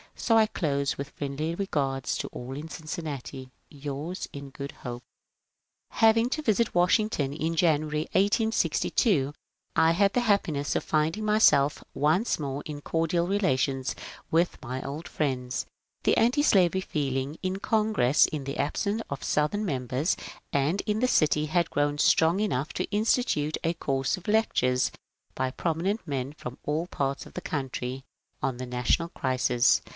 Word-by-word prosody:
So 225 Hz, -, +1 dB
I 220 Hz, -, +6 dB
close 140 Hz, -9 st, -1 dB
with 140 Hz, +1 st, -5 dB
friendly 150 Hz, +4 st, -3 dB
regards 140 Hz, -9 st, -1 dB
to -, -, -3 dB
all 125 Hz, +2 st, -7 dB
in 155 Hz, +3 st, -7 dB
Cincinnati. 145 Hz, -5 st, -6 dB
— -, -, -43 dB
Yours 145 Hz, +5 st, -5 dB
in 140 Hz, -1 st, -7 dB
good 140 Hz, +1 st, -7 dB
hope. 120 Hz, -1 st, -7 dB, 0.9 s
Having 225 Hz, +2 st, +4 dB
to 310 Hz, -, -1 dB
visit 230 Hz, -4 st, +1 dB
Washington 175 Hz, -5 st, +2 dB
in 165 Hz, +2 st, -2 dB
January, 155 Hz, -2 st, +2 dB
1862, 200 Hz, -, +2 dB, 0.4 s
1 165 Hz, +1 st, +4 dB
had 200 Hz, +2 st, +3 dB
the 245 Hz, -, +2 dB
happiness 170 Hz, -10 st, +1 dB
of -, -, 0 dB
finding 160 Hz, +7 st, 0 dB
myself 210 Hz, -10 st, +4 dB
once 160 Hz, -, +1 dB
more 140 Hz, -1 st, -3 dB
in 145 Hz, -1 st, -6 dB
cordial 165 Hz, +2 st, 0 dB
relations 135 Hz, -9 st, 0 dB, 0.4 s
with 170 Hz, +2 st, +1 dB
my 130 Hz, +1 st, -4 dB
old 145 Hz, +5 st, -6 dB
friends. 130 Hz, -4 st, -2 dB, 0.4 s
The -, -, +3 dB
antislavery 215 Hz, -, +4 dB
feeling 140 Hz, -3 st, -2 dB
in 185 Hz, 0 st, -1 dB
Congress, 210 Hz, -, +3 dB
in 150 Hz, -3 st, -4 dB
the 140 Hz, +1 st, -5 dB
absence 200 Hz, +9 st, -1 dB
of 140 Hz, -, -5 dB
Southern 205 Hz, +8 st, 0 dB
members, 130 Hz, -, -1 dB, 0.4 s
and 145 Hz, +8 st, +1 dB
in 210 Hz, 0 st, -1 dB
the 255 Hz, -, +3 dB
city 155 Hz, -7 st, +3 dB
had 170 Hz, +2 st, +1 dB
grown 145 Hz, 0 st, +1 dB
strong 165 Hz, +5 st, +4 dB
enough 155 Hz, -8 st, -1 dB
to -, -, -1 dB
institute 210 Hz, -, +1 dB
a 165 Hz, -, +1 dB
course 135 Hz, 0 st, -1 dB
of 180 Hz, -, -12 dB
lectures 130 Hz, -, +2 dB, 0.4 s
by 130 Hz, 0 st, -1 dB
prominent 175 Hz, -, -1 dB
men 135 Hz, -1 st, -3 dB
from 125 Hz, -3 st, -8 dB
all 155 Hz, +4 st, -1 dB
parts 140 Hz, -4 st, -2 dB
of -, -, -14 dB
the 180 Hz, -, -5 dB
country 135 Hz, -5 st, -4 dB, 0.4 s
on 130 Hz, -2 st, -1 dB
the 130 Hz, -, -5 dB
national 125 Hz, +7 st, 0 dB
crisis. 130 Hz, -4 st, +2 dB
155 Hz, 150 wpm, -27 LUFS, 135-190 Hz, 0.9 s, I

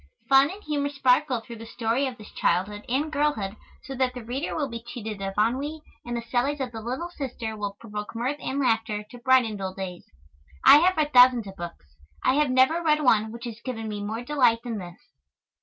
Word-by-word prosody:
Fun 270 Hz, +1 st, +6 dB
and 405 Hz, +4 st, -9 dB
humor 285 Hz, -2 st, -1 dB
sparkle 265 Hz, -2 st, +2 dB
through 230 Hz, 0 st, -10 dB
the 225 Hz, +1 st, -10 dB
story 235 Hz, +4 st, 0 dB
of 250 Hz, -2 st, -6 dB
this 215 Hz, -, -13 dB
childhood 200 Hz, +4 st, 0 dB
and 290 Hz, +5 st, 0 dB
girlhood 285 Hz, -10 st, 0 dB, 0.3 s
so 270 Hz, -, -7 dB
that 255 Hz, -1 st, 0 dB
the 250 Hz, -, -7 dB
reader 255 Hz, +6 st, -3 dB
will 295 Hz, -3 st, -1 dB
be 235 Hz, -2 st, -7 dB
cheated 220 Hz, -3 st, -7 dB
of 195 Hz, 0 st, -4 dB
ennui, 275 Hz, +8 st, 0 dB, 0.2 s
and 240 Hz, 0 st, -4 dB
the 235 Hz, -, -4 dB
sallies 250 Hz, +5 st, 0 dB
of 260 Hz, -2 st, -3 dB
the 225 Hz, -1 st, -7 dB
little 255 Hz, +10 st, -4 dB
sister 245 Hz, -8 st, -5 dB
will 205 Hz, -1 st, -5 dB
provoke 210 Hz, -1 st, -7 dB
mirth 255 Hz, +5 st, -1 dB
and 275 Hz, -, -3 dB
laughter 225 Hz, -4 st, 0 dB
to 245 Hz, -, -11 dB
brighten 240 Hz, -3 st, +3 dB
dull 190 Hz, -1 st, -5 dB
days. 185 Hz, -2 st, -7 dB, 0.6 s
I -, -, +10 dB
have 360 Hz, +4 st, +3 dB
read 300 Hz, -1 st, 0 dB
thousands 250 Hz, -2 st, +7 dB
of 195 Hz, -1 st, -9 dB
books. 170 Hz, -, -8 dB, 0.4 s
I -, -, +4 dB
have 295 Hz, 0 st, +2 dB
never 260 Hz, +6 st, +4 dB
read 305 Hz, -2 st, +2 dB
one 220 Hz, -4 st, +3 dB
which 235 Hz, +2 st, -8 dB
has 230 Hz, -1 st, -7 dB
given 225 Hz, -4 st, -4 dB
me 210 Hz, -1 st, -4 dB
more 220 Hz, +3 st, -4 dB
delight 245 Hz, -4 st, +2 dB
than 230 Hz, -4 st, -4 dB
this. 175 Hz, -2 st, -9 dB
240 Hz, 215 wpm, -26 LUFS, 220-275 Hz, 0.6 s, I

